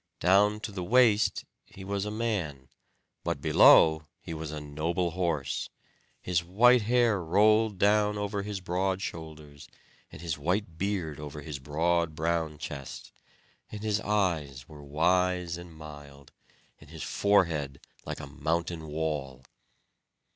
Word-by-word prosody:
Down 100 +4 +4
to 105 - -5
the 95 -2 -5
waist 115 +1 +3 0.2
he 95 - -12
was 100 +1 -2
a - - -3
man; 95 - -3 0.5
but - - -2
below 80 -1 +6
he 80 - -8
was 80 -1 -5
a 75 0 -5
noble 80 +4 -2
horse; 80 -7 -2 0.5
his 85 -2 -1
white 120 +8 +5
hair 115 -2 +2
rolled 105 +4 +3
down 105 +1 +3
over 100 0 -2
his 100 -1 -5
broad 95 +1 -1
shoulders, 75 -3 -8 0.4
and - - -11
his 80 -3 -4
white 85 +1 -2
beard 90 -7 -2
over 75 0 -7
his 70 -1 -6
broad 80 +3 0
brown 80 -1 -1
chest; 70 -2 -8 0.6
and 105 0 -7
his 105 -1 0
eyes 80 - -1
were 75 -1 -12
wise 90 +4 +1
and 85 0 -10
mild, 75 -3 -12 0.5
and - - -16
his - - -8
forehead 80 -9 +1 0.2
like - - -6
a - - -6
mountain 80 +3 -3
wall. 75 -4 -4
85 Hz, 140 wpm, -28 LUFS, 75-100 Hz, 0.6 s, below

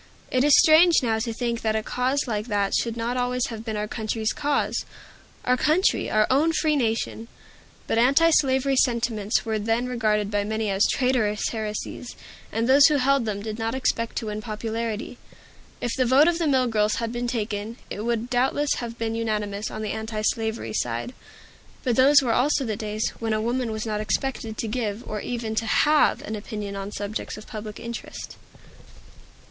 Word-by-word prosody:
It 255 0 +2
is 295 -1 +6
strange 325 -1 +6
now 225 -2 +1
to 230 +1 -2
think 235 0 -2
that 220 -1 0
a 220 - -1
cause 260 +5 0
like 215 -1 -2
that 200 -3 0
should 230 -1 0
not 235 +2 -2
always 250 0 0
have 225 -2 -7
been 220 -2 -4
our 210 0 -2
country's 220 0 -2
cause, 290 -1 0 0.6
our 250 - +3
country, 315 - +2
our 215 0 +3
own 310 +5 +3
free 310 -1 +2
nation! 225 -2 -1 0.6
But 225 - +1
antislavery 275 0 +4
sentiments 235 -4 +1
were 220 -1 -1
then 225 +3 0
regarded 215 -4 0
by 205 -1 +1
many 220 0 -2
as 195 +1 +3
traitorous 245 -5 +1
heresies; 220 +2 -5 0.4
and 225 +1 0
those 275 +2 +7
who 305 - +2
held 275 -2 +2
them 200 -2 -3
did 215 0 -5
not 225 +2 -1
expect 230 -3 -1
to - - -2
win 210 0 -4
popularity. 225 +1 -4 0.6
If 240 - -1
the 260 - +2
vote 265 +6 +5
of 345 0 +1
the 330 - +1
mill 260 -3 +3
girls 215 -2 +1
had 230 -1 -2
been 240 0 -3
taken, 220 -1 -3
it 210 - -4
would 235 0 -1
doubtless 265 +4 +1
have 235 -1 -5
been 225 -1 -2
unanimous 210 -2 -2
on 215 - -6
the 215 - -2
antislavery 220 - -2
side. 120 - -2 0.7
But 245 -3 +1
those 280 +3 +6
were 235 -3 +1
also 275 +2 +2
the 220 -2 -2
days 215 0 -2
when 225 -1 -1
a 215 - +1
woman 240 +1 -1
was 220 0 -4
not 210 -1 -2
expected 225 -1 -2
to 225 - -2
give, 220 0 -3
or 210 -1 -4
even 235 -3 -3
to 220 +1 -1
have, 300 +6 +3
an 215 - -4
opinion 205 -1 -6
on 195 +1 -5
subjects 205 +1 -5
of 215 - -10
public 215 -1 -7
interest. 235 0 -7
230 Hz, 185 wpm, -24 LUFS, 215-255 Hz, 0.7 s, those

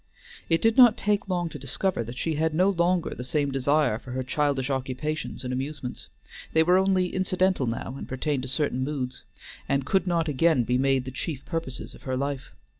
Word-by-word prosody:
It 165 -1 +2
did 225 0 +3
not 245 -3 +8
take 205 -1 0
long 175 -2 0
to - - -8
discover 190 -11 -1
that 120 +2 -8
she 160 - -1
had 155 +1 0
no 185 +4 +4
longer 175 -1 +1
the 125 - -6
same 140 +2 0
desire 135 -3 +2
for 125 0 -9
her 130 0 -2
childish 140 -1 0
occupations 135 +4 -3
and 125 0 -3
amusements; 135 -1 -5 0.5
they 160 - +5
were 180 +3 +5
only 190 -2 +2
incidental 185 -5 +1
now 115 +2 -3
and - - -7
pertained 135 +1 -1
to 130 - -5
certain 130 -1 0
moods, 130 -3 -3 0.5
and 140 -1 +1
could 190 +4 +1
not 170 -2 +1
again 150 -1 +3
be 125 +2 +1
made 135 -1 +2
the 130 - -5
chief 140 +1 -5
purposes 165 -6 -4
of - - -14
her 130 -1 -2
life. 140 -1 -3
145 Hz, 200 wpm, -26 LUFS, 130-170 Hz, 0.5 s, not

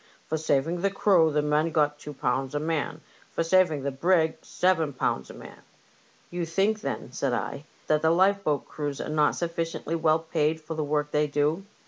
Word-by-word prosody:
For 160 - -1
saving 160 +3 0
the 200 - +2
crew 190 -5 +3
the 150 0 +1
men 150 +2 +2
got 150 -1 +1
two 150 0 -8
pounds 135 +1 -1
a - - +1
man, 155 0 -2 0.3
for - - -1
saving 165 -4 +3
the 140 - -1
brig 160 +3 +2
seven 165 -5 +1
pounds 65 - -1
a - - -9
man." - - -12 0.7
You 175 0 -2
think, 195 +6 0
then," - - -4
said 130 0 -1
I, 140 +4 -3
" - - -32
that 155 0 +2
the 160 - +3
lifeboat 185 -3 +2
crews 145 -2 -4
are - - -4
not 150 -1 +2
sufficiently 165 -1 -3
well 160 -1 +3
paid 160 -1 -1
for 160 +1 -7
the 155 -1 -2
work 150 0 -1
they 150 0 +2
do 150 +6 0
155 Hz, 195 wpm, -27 LUFS, 150-165 Hz, 0.7 s, crew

